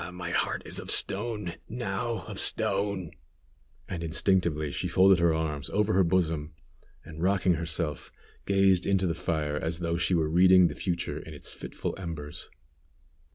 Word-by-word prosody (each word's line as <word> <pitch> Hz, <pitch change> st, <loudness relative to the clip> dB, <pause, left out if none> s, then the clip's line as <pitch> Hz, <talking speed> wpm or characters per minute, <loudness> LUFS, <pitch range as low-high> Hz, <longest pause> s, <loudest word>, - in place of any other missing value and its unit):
Ah! 90 Hz, -, -7 dB
my 90 Hz, 0 st, -6 dB
heart -, -, -1 dB
is -, -, +1 dB
of -, -, -8 dB
stone, 105 Hz, -3 st, +3 dB, 0.2 s
now 115 Hz, 0 st, -3 dB
of -, -, -6 dB
stone!" 100 Hz, -3 st, +1 dB, 0.8 s
and 85 Hz, -3 st, -5 dB
instinctively 80 Hz, -3 st, 0 dB
she 90 Hz, -, -3 dB
folded 95 Hz, +1 st, +5 dB
her 85 Hz, -1 st, +3 dB
arms 80 Hz, -2 st, -2 dB
over 105 Hz, +1 st, +1 dB
her 95 Hz, -, +4 dB
bosom, 80 Hz, -4 st, 0 dB, 0.5 s
and, 80 Hz, 0 st, -9 dB
rocking 95 Hz, 0 st, +2 dB
herself, 80 Hz, -2 st, -3 dB, 0.4 s
gazed 95 Hz, -2 st, +3 dB
into 95 Hz, -1 st, +2 dB
the 85 Hz, -, 0 dB
fire 80 Hz, -3 st, -2 dB
as 80 Hz, +2 st, -2 dB
though 85 Hz, -1 st, -2 dB
she 85 Hz, +1 st, +1 dB
were 80 Hz, -2 st, +1 dB
reading 90 Hz, +2 st, +5 dB
the -, -, -6 dB
future 85 Hz, -2 st, -3 dB
in -, -, -10 dB
its -, -, -5 dB
fitful -, -, -5 dB
embers. 80 Hz, -5 st, -7 dB
90 Hz, 160 wpm, -28 LUFS, 80-95 Hz, 0.8 s, folded